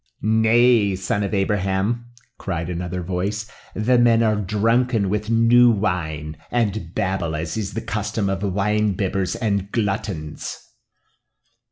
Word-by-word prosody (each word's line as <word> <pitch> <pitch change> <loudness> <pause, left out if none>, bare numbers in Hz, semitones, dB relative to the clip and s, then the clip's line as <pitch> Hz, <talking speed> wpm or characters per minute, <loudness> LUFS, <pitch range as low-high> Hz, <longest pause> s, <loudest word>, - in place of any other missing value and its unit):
"Nay, 110 -1 +4
son 95 +2 -2
of 100 - -2
Abraham," 100 +3 0 0.3
cried 85 +2 -3
another 90 +1 -4
voice, 95 +4 -2 0.3
"the 120 +3 +3
men 115 -1 +4
are 110 -1 +2
drunken 110 +2 +1
with 105 +2 -2
new 115 +2 +5
wine, 80 -8 -2
and 105 -7 -1
babble 95 -6 -1
as 80 +1 -3
is 105 -4 -4
the 115 - -2
custom 105 -1 -2
of 95 0 -2
wine 105 +1 +1
bibbers 95 -1 -1
and 100 -3 -1
gluttons." 95 -8 -3
100 Hz, 130 wpm, -22 LUFS, 95-110 Hz, 0.3 s, new